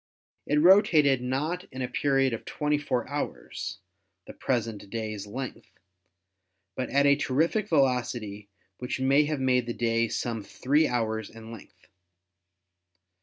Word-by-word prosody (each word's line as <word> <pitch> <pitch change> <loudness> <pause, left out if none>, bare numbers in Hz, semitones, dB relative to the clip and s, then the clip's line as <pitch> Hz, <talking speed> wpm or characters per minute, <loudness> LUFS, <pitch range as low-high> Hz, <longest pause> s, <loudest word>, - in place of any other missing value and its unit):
It 150 - +2
rotated 155 - +5
not 150 +8 -2
in 130 0 -4
a - - -1
period 135 0 +1
of 115 - -5
24 145 -4 -1
hours, 145 +1 -5 0.5
the - - -10
present 115 -5 -2
day's 110 -2 -4
length, 130 +5 -6 1.1
but 130 - -3
at 140 +1 +3
a 140 0 +6
terrific 155 - 0
velocity 120 - 0 0.3
which 125 +1 -3
may 135 +3 +4
have 150 -1 -2
made 125 -2 +2
the 120 - -3
day 115 -1 +1
some 115 0 -3
three 145 +9 +1
hours 110 -3 -2
in 115 0 -11
length. 115 - -13
130 Hz, 130 wpm, -27 LUFS, 115-145 Hz, 1.1 s, a